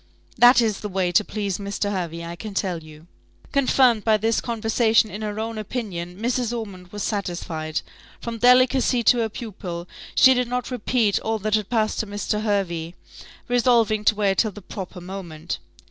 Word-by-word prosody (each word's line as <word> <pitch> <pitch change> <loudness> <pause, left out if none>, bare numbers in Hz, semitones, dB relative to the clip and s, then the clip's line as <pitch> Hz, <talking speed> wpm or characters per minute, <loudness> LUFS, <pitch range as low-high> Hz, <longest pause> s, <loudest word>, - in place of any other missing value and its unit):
That 245 +1 +7
is 215 -3 0
the 210 - -5
way 185 -2 0
to 210 - +4
please 200 -3 -3
Mr. 200 0 -2
Hervey, 170 -3 -4
I 170 0 -6
can 205 +3 -8
tell 180 -4 -1
you." 155 0 -14 0.5
Confirmed 255 -5 +3
by 220 -1 +4
this 225 +2 +1
conversation 225 -1 +2
in 210 - -6
her 210 0 -3
own 225 0 -3
opinion, 195 -6 -5
Mrs. 240 0 -1
Ormond 195 -5 -7
was 205 +2 -6
satisfied. 170 -6 -3 0.4
From 230 -1 -5
delicacy 250 0 +4
to 245 - +5
her 225 -1 0
pupil, 185 -6 -7 0.3
she 260 - +7
did 250 -1 0
not 250 +1 -3
repeat 235 -3 +1
all 225 0 -1
that 215 0 -3
had 215 -2 +1
passed 220 -3 0
to 220 - -1
Mr. 205 +1 -2
Hervey, 180 -6 -1 0.5
resolving 235 -3 +3
to 215 - +5
wait 200 -2 +1
till 220 - +3
the 210 - -10
proper 185 -1 -7
moment. 175 -4 -6
215 Hz, 175 wpm, -23 LUFS, 185-230 Hz, 0.5 s, That